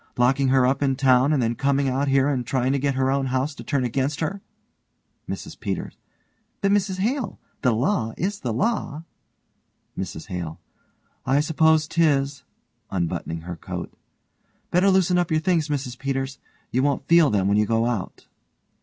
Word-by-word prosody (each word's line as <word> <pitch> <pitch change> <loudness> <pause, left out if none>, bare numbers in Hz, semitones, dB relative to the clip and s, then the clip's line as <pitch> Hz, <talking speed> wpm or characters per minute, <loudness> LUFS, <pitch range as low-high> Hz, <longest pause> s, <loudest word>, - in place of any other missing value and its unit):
Locking 130 +2 +3
her 130 -1 +4
up 135 +2 +1
in 135 -2 +2
town 130 +1 +4
and 140 -5 +2
then 115 0 +1
coming 140 +2 +1
out 135 +2 0
here 135 0 +3
and 135 -4 0
trying 130 +2 0
to 140 - +1
get 140 0 0
her 130 0 +1
own 135 -1 0
house 130 +3 -1
to - - -10
turn 140 -3 0
against 135 +5 -1
her! 180 +5 -2 0.9
MRS - - -6
PETERS: - - -4 0.6
But 200 - +1
Mrs 195 -2 +1
Hale, 230 +2 -1 0.2
the 125 - +3
law 115 - 0
is 200 +4 -2
the 120 - -3
law. 165 - -1 0.9
MRS 90 -4 -5
HALE: 85 -4 -5 0.6
I 135 +2 +2
s'pose 160 0 +3
'tis, 140 -5 +1 0.5
(unbuttoning 85 -2 -3
her 85 +1 -6
coat) - - -6 0.8
Better 180 +3 +4
loosen 185 -2 +3
up 175 - 0
your 155 - +2
things, 160 -2 +1
Mrs 130 -4 -3
Peters. 135 0 -3 0.3
You 130 - +1
won't 140 -1 0
feel 170 -3 +6
them 100 -2 +1
when 100 +1 +3
you 105 0 +2
go 115 +1 +2
out. 115 -6 -3
135 Hz, 170 wpm, -24 LUFS, 125-155 Hz, 0.9 s, feel